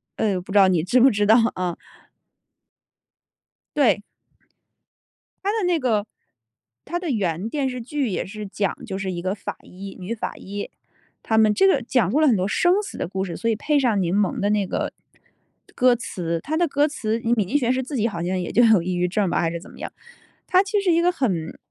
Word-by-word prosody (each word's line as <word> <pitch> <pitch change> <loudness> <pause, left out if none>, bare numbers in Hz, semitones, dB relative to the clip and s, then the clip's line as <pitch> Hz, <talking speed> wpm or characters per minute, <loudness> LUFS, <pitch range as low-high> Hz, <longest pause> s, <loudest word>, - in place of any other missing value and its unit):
呃， 195 -4 0
不 195 - -11
知 205 - +2
道 195 -1 +7
你 175 -4 +2
知 240 +8 +3
不 265 +2 +6
知 210 -1 0
道 220 - +7 0.2
啊。 180 -2 -3 2.0
对。 250 -7 +3 1.4
它 400 - +1
的 435 -4 -1
那 350 -2 +2
个 220 -6 +1 0.8
它 350 +3 -3
的 350 -4 -4
原 195 -2 -1
电 280 -1 -1
视 250 -1 -5
剧 270 0 -2
也 185 - -2
是 210 +2 -7
讲 200 0 -2
就 190 - -4
是 195 -1 -3
一 175 -1 -4
个 190 +3 -2
法 200 - -6
医 195 +2 -10
女 190 +6 -4
法 - - -5
医， 205 +1 -6 0.5
他 220 - 0
们 215 -1 +5
这 390 - +4
个 280 -9 +3
讲 230 -5 +1
述 285 - +2
了 310 - +4
很 235 - +5
多 185 0 0
生 355 - +3
死 400 - -8
的 - - -3
故 190 +1 -3
事， 175 -4 -5
所 230 - -1
以 225 - +2
配 290 +6 +1
上 225 -7 +2
柠 175 +1 0
檬 205 -2 +1
的 200 - +1
那 210 -1 +1
个 - - -2 0.8
歌 250 -1 +4
词。 170 -7 -3
它 315 +2 -2
的 345 - +2
歌 290 0 +2
词 230 -6 -2
米 230 -3 +1
津 275 +10 +1
玄 245 -3 +1
师 255 - 0
是 - - -1
自 275 +2 -6
己 225 +1 +2
好 170 -6 -4
像 185 +1 -1
也 175 - -4
就 240 - +4
有 220 -6 +5
抑 180 +1 -2
郁 180 0 +1
症 195 0 0
吧， - - 0
还 165 -1 0
是 170 - -4
怎 - - -14
么 - - -15
样， - - -6 0.6
它 370 +1 +4
其 405 +1 0
实 - - -8
是 - - +4
一 335 - +3
个 355 - +3
很 190 - -2
215 Hz, 250 characters per minute, -23 LUFS, 190-270 Hz, 2.0 s, 道